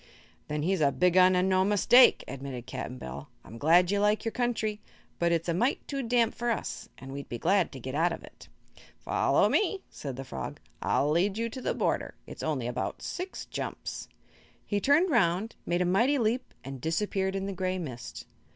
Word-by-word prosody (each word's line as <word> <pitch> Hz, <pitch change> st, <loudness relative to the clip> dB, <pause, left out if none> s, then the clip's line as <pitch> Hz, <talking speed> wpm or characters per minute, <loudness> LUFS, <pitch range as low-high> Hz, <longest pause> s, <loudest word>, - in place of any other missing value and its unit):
"Then 150 Hz, 0 st, -2 dB
he's 185 Hz, 0 st, +1 dB
a 140 Hz, -2 st, +4 dB
big 180 Hz, +2 st, +2 dB
un, 185 Hz, 0 st, +6 dB
an' 180 Hz, +1 st, +2 dB
no 185 Hz, 0 st, +3 dB
mistake," 210 Hz, +5 st, +6 dB
admitted 130 Hz, -2 st, -6 dB
Cap'n 125 Hz, -, -6 dB
Bill. 65 Hz, -, -8 dB
"I'm 115 Hz, +4 st, -11 dB
glad 175 Hz, +4 st, +5 dB
you 205 Hz, -, +1 dB
like 210 Hz, +2 st, +2 dB
your 225 Hz, -, 0 dB
country, 220 Hz, -4 st, -1 dB, 0.4 s
but 170 Hz, 0 st, +2 dB
it's 165 Hz, 0 st, 0 dB
a 170 Hz, -, +1 dB
mite 240 Hz, +10 st, 0 dB
too 275 Hz, -1 st, -2 dB
damp 235 Hz, -2 st, +2 dB
for 240 Hz, 0 st, -2 dB
us, 230 Hz, -, -3 dB
an' 135 Hz, 0 st, -9 dB
we'd 140 Hz, 0 st, -7 dB
be 120 Hz, -, -4 dB
glad 185 Hz, -, +2 dB
to 135 Hz, -, -8 dB
get 130 Hz, +2 st, -6 dB
out 165 Hz, +4 st, +2 dB
of -, -, -6 dB
it." -, -, -15 dB, 0.5 s
"Follow -, -, +2 dB
me," 400 Hz, -1 st, +1 dB
said 135 Hz, -3 st, -6 dB
the 135 Hz, -, -6 dB
frog. 65 Hz, -, -6 dB, 0.2 s
"I'll 145 Hz, +2 st, +1 dB
lead 190 Hz, +6 st, +2 dB
you 230 Hz, +1 st, -1 dB
to 255 Hz, +3 st, -7 dB
the -, -, -1 dB
border. -, -, -1 dB
It's -, -, -9 dB
only -, -, -1 dB
about -, -, -3 dB
six 370 Hz, +1 st, -5 dB
jumps." -, -, -5 dB, 0.6 s
He 205 Hz, -, 0 dB
turned 310 Hz, -, +4 dB
around, 200 Hz, -2 st, +2 dB
made 175 Hz, +1 st, +1 dB
a -, -, -1 dB
mighty 235 Hz, +11 st, +3 dB
leap 240 Hz, +1 st, 0 dB
and 135 Hz, -1 st, -7 dB
disappeared 190 Hz, +4 st, -1 dB
in 195 Hz, 0 st, -2 dB
the 195 Hz, -, -3 dB
gray 185 Hz, 0 st, -1 dB
mist. 130 Hz, -9 st, -7 dB
185 Hz, 205 wpm, -29 LUFS, 150-225 Hz, 0.6 s, un